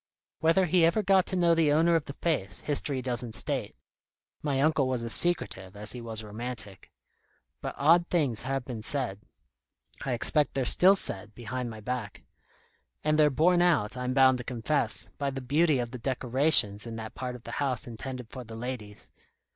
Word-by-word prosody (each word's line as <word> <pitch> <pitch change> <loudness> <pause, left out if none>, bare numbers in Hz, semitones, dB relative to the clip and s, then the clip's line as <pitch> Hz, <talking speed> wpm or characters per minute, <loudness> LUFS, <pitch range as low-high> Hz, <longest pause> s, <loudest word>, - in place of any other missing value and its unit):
Whether 165 +4 +3
he 175 0 +2
ever 170 +6 +3
got 190 -1 +3
to - - -1
know 170 -2 +3
the 165 -3 +3
owner 165 +3 +3
of 165 -3 +1
the 140 - -7
face, 100 - -1
history 140 -2 0
doesn't 120 -3 -1
state: - - -1 0.7
my 140 -3 -1
uncle 145 -2 +2
was 125 -2 -2
as 115 - +3
secretive 95 - +1
as 105 +1 -3
he 125 - -7
was 110 -1 -4
romantic. 110 -2 -6 0.7
But - - -5
odd 170 +4 +4
things 140 -10 0
have 135 -1 -3
been 120 -4 -6
said. 120 -5 -2 0.8
I 130 - -2
expect 145 +5 +1
they're 135 -2 0
still 190 +9 +5
said, 105 - -2
behind 120 +1 -5
my 110 -1 -9
back. 120 -2 -5 0.8
And 155 0 +1
they're 150 -1 +6
borne 175 +6 +3
out, 160 -13 +2
I'm 125 0 -3
bound 130 -2 +5
to - - -5
confess, 120 - -2
by 140 -1 -1
the 135 0 -5
beauty 150 +4 +2
of 120 -2 -3
the 125 - -7
decorations 125 -4 +3
in 115 - -6
that 110 0 -7
part 125 -1 -5
of 120 - -12
the - - -8
house 130 -4 -1
intended 125 0 -8
for 130 - -7
the 115 -1 -10
ladies. 115 -3 -7
130 Hz, 185 wpm, -28 LUFS, 115-155 Hz, 0.8 s, they're